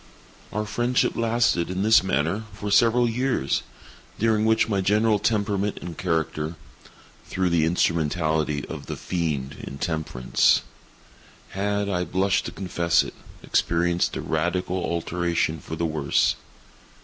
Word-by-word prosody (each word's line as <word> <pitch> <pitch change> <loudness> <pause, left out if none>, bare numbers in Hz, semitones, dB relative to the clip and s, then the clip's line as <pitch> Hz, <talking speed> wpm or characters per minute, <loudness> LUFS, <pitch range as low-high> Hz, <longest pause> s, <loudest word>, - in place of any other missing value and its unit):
Our 105 +1 -2
friendship 120 +4 0
lasted, 115 -7 +1
in 95 +1 -2
this 110 0 +6
manner, 95 +4 -1
for 100 0 -5
several 120 +3 +4
years, 125 - 0 0.6
during 110 -1 +2
which 110 0 +3
my 100 -3 0
general 105 +2 +3
temperament 100 -2 0
and 85 -2 -7
character—through 80 +2 -4
the 80 -2 +3
instrumentality 80 -3 0
of - - -8
the - - -4
Fiend 75 -6 -3
Intemperance—had 80 +6 -2
(I 90 -3 0
blush 95 +2 +1
to - - -4
confess 85 -3 +1
it) - - -8 0.3
experienced 85 +1 +1
a - - -3
radical 90 +3 -1
alteration 85 -1 -1
for 80 - -7
the 85 +1 -1
worse. 75 -3 +1
90 Hz, 120 wpm, -24 LUFS, 80-105 Hz, 0.6 s, this